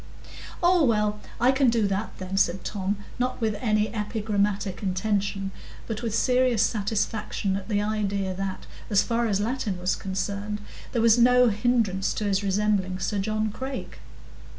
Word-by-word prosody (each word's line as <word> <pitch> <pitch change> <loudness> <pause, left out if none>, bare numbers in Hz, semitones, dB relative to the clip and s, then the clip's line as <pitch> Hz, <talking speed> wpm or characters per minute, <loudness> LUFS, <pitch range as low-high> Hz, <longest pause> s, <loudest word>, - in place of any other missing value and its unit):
"Oh, 350 -1 +5
well, 210 -4 +2 0.2
I 245 +3 +5
can 265 -1 +3
do 230 -2 +2
that, 200 +2 -3
then," 185 +1 -5
said 190 -2 +2
Tom, 200 0 -2 0.2
not 250 +1 -1
with 220 -2 +1
any 215 -2 +1
epigrammatic 205 -3 -1
intention, 195 0 -1 0.3
but 220 -1 -4
with 225 -3 -2
serious 250 -3 +3
satisfaction 210 -2 -1
at 195 +2 -5
the 205 -1 +1
idea 200 -3 -1
that, 190 0 -4 0.2
as 205 -3 +4
far 235 0 0
as 200 -2 +1
Latin 215 -3 -1
was 180 +1 0
concerned, 200 +2 -3 0.3
there 235 -2 +1
was 230 +1 +6
no 250 0 +6
hindrance 210 -3 +1
to 215 - -2
his 200 -1 +1
resembling 195 -2 +1
Sir 195 +2 -1
John 215 +1 -1
Crake. 265 +4 -6
210 Hz, 155 wpm, -26 LUFS, 195-230 Hz, 0.3 s, was